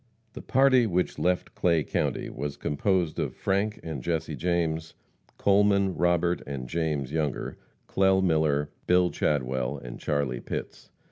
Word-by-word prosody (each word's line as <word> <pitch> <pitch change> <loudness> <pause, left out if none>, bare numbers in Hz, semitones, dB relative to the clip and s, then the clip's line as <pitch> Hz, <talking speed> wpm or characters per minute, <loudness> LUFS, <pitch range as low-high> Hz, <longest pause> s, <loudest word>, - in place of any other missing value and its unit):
The - - -8
party 130 -2 +4
which 90 -2 -1
left 90 0 0
Clay 85 -3 +2
county - - -1
was 70 +1 -5
composed 85 +2 0
of - - -2
Frank 100 +2 -1
and 80 -5 -5
Jesse 80 0 -2
James; 80 -1 -1 0.4
Coleman, 100 -1 +3
Robert 85 0 +1
and 65 -3 -5
James 75 -3 -2
Younger; 75 -3 -2 0.3
Clell 95 0 +3
Miller, 75 -4 +1 0.2
Bill 90 0 +4
Chadwell 65 -1 -1
and 60 -3 -9
Charlie 70 -4 -1
Pitts. - - -6
80 Hz, 135 wpm, -27 LUFS, 75-90 Hz, 0.4 s, party